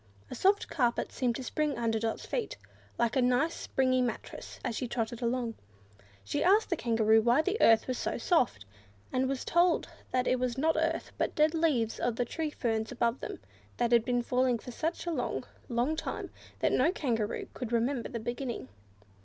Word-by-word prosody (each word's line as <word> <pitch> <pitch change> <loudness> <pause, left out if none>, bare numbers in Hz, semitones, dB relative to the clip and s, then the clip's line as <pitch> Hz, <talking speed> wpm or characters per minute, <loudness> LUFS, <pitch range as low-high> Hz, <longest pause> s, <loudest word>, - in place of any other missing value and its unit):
A - - -3
soft 400 +2 +2
carpet 245 -6 0
seemed 245 -3 0
to 265 - -5
spring 300 +1 -1
under 225 -2 0
Dot's 225 0 -2
feet, 480 - -3 0.4
like 235 -1 +1
a 260 - +4
nice 250 +7 +2
springy 255 -1 +1
mattress, 245 -1 -4
as 240 -3 -1
she 250 - -2
trotted 230 0 -3
along. 235 -1 -1 0.7
She 100 - -1
asked 400 +4 +4
the - - +3
Kangaroo 225 -4 +3
why 240 +7 +4
the 390 +5 -1
earth 225 -1 +6
was 255 -1 -2
so - - -1
soft, 245 - +1 0.5
and 260 +1 +1
was 270 -1 -2
told 345 0 +3 0.2
that 255 0 +1
it 255 - +2
was 250 -1 -1
not 320 +4 +2
earth, 325 +1 -1
but - - 0
the 300 - +4
dead 310 +1 +3
leaves 295 -9 +1
of 240 -2 0
the 245 - 0
tree 315 +5 -3
ferns 225 -6 -2
above 235 0 0
them, - - -6 0.4
that 240 -1 +1
had 235 -2 +5
been 245 0 0
falling 250 0 +2
for 250 - -9
such 325 +9 -3
a 345 - -1
long, 260 -4 -2 0.3
long 245 +6 +1
time, - - -4 0.3
that - - +3
no 295 +7 +3
Kangaroo 230 - -2
could 245 -3 -5
remember 235 +1 0
the 235 - -4
beginning. 240 - -4
250 Hz, 195 wpm, -30 LUFS, 235-300 Hz, 0.7 s, earth